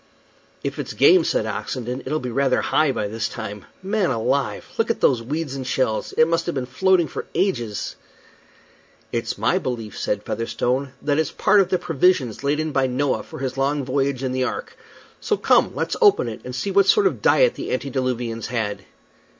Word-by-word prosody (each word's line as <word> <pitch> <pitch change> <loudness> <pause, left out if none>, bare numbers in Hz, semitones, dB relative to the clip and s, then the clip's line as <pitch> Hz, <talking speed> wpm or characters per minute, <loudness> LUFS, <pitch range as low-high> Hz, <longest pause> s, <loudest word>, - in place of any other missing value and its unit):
"If - - -4
it's - - -4
game," 375 -3 +6
said - - 0
Oxenden, 125 0 -4
"it'll 155 - 0
be 125 -3 -5
rather 135 +1 +2
high 155 -3 +2
by 105 -5 -2
this 110 +2 -3
time. 105 -3 -7 0.2
Man 200 -1 +1
alive! 130 +2 -1
look 225 - +2
at 230 - 0
those 125 -4 +3
weeds 145 +4 -3
and 130 -2 -5
shells. 130 -4 0
It 160 - +4
must 165 0 0
have 170 - -2
been 130 -2 -2
floating 175 +7 +2
for - - -6
ages." 120 - -1 1.1
"It's 115 -1 -2
my 110 +4 +2
belief," 115 -4 -4
said 105 0 -2
Featherstone, 130 +3 -2
"that 145 +1 +1
it's 160 - +1
part 210 - +3
of 195 - +3
the 185 - +2
provisions 155 - +1
laid 145 +2 +1
in 155 0 -1
by 135 -2 +2
Noah 130 +2 0
for - - -10
his 130 0 -4
long 140 0 0
voyage 135 0 -1
in 130 - -1
the 130 0 0
ark. 470 - -4 0.4
So 425 - 0
come, - - +3
let's - - -1
open 410 - +5
it, 110 - -6
and 125 0 -6
see 195 +10 -2
what 200 0 +4
sort 415 - +5
of 390 - +1
diet - - +4
the - - -6
antediluvians 125 -4 -2
had." 110 -4 -3
135 Hz, 195 wpm, -22 LUFS, 120-165 Hz, 1.1 s, game